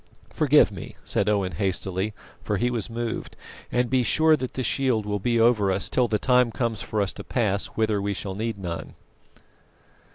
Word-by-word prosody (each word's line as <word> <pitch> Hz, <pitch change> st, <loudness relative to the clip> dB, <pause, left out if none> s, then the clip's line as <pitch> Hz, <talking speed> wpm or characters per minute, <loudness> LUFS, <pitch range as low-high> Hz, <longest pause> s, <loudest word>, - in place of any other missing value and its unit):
"Forgive -, -, +4 dB
me," -, -, -9 dB
said 100 Hz, -, 0 dB
Owen 100 Hz, -3 st, +1 dB
hastily, 95 Hz, +3 st, -2 dB, 0.3 s
for 105 Hz, -, -1 dB
he 120 Hz, +4 st, +1 dB
was 115 Hz, -3 st, -2 dB
moved; 115 Hz, 0 st, -4 dB, 0.4 s
"and 125 Hz, 0 st, +1 dB
be 130 Hz, +1 st, +2 dB
sure 155 Hz, +7 st, +4 dB
that 130 Hz, -3 st, -5 dB
the 130 Hz, -, -2 dB
shield 125 Hz, -3 st, +1 dB
will 105 Hz, 0 st, -2 dB
be 115 Hz, +3 st, +1 dB
over 115 Hz, -4 st, +4 dB
us 95 Hz, +1 st, 0 dB
till 125 Hz, -2 st, +2 dB
the 110 Hz, -, +1 dB
time 125 Hz, +1 st, +3 dB
comes 115 Hz, -3 st, -2 dB
for 105 Hz, +1 st, -2 dB
us 100 Hz, -, -3 dB
to -, -, -8 dB
pass 100 Hz, -5 st, 0 dB
whither 110 Hz, -2 st, +1 dB
we 100 Hz, 0 st, -2 dB
shall 95 Hz, 0 st, -4 dB
need 110 Hz, +2 st, -3 dB
none." 85 Hz, -4 st, -6 dB
110 Hz, 190 wpm, -25 LUFS, 100-120 Hz, 0.4 s, Forgive